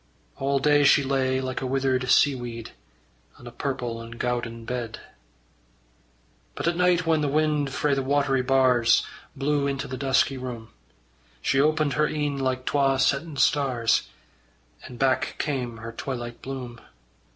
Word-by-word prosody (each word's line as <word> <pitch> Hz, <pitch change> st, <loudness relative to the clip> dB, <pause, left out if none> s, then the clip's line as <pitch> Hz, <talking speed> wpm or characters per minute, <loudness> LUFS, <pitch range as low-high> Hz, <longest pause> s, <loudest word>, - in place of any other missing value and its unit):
All 140 Hz, +1 st, 0 dB
day 145 Hz, +1 st, +4 dB
she 140 Hz, +1 st, +5 dB
lay 130 Hz, -1 st, 0 dB
like 130 Hz, -1 st, -4 dB
a 130 Hz, -, -2 dB
withered 130 Hz, -1 st, 0 dB
seaweed, 120 Hz, -5 st, +1 dB, 0.7 s
On -, -, -15 dB
a 120 Hz, -, -8 dB
purple 120 Hz, -2 st, -4 dB
and 115 Hz, 0 st, -10 dB
gowden 120 Hz, -2 st, -3 dB
bed. 120 Hz, -2 st, -4 dB, 1.6 s
But -, -, -3 dB
at 170 Hz, -, +1 dB
night 180 Hz, -1 st, +2 dB
whan 160 Hz, -2 st, +2 dB
the 145 Hz, -, 0 dB
wind 150 Hz, -1 st, +1 dB
frae 145 Hz, +1 st, 0 dB
the 135 Hz, -, +1 dB
watery 135 Hz, -1 st, +1 dB
bars 125 Hz, -2 st, +3 dB, 0.3 s
Blew 140 Hz, +1 st, 0 dB
into 135 Hz, -1 st, -3 dB
the 130 Hz, -, -5 dB
dusky 135 Hz, 0 st, +2 dB
room, 120 Hz, -3 st, -7 dB, 0.7 s
She 135 Hz, -, +2 dB
opened 155 Hz, -1 st, +2 dB
her 150 Hz, +3 st, +2 dB
een 145 Hz, -2 st, -2 dB
like 130 Hz, -1 st, -1 dB
twa 135 Hz, -2 st, +2 dB
settin' 140 Hz, +3 st, 0 dB
stars, 130 Hz, -7 st, +2 dB, 0.8 s
And 125 Hz, -, -10 dB
back 130 Hz, 0 st, +1 dB
came 125 Hz, -6 st, -3 dB
her 115 Hz, 0 st, -7 dB
twilight 120 Hz, -1 st, -6 dB
bloom. 125 Hz, -3 st, -7 dB
135 Hz, 150 wpm, -25 LUFS, 125-145 Hz, 1.6 s, she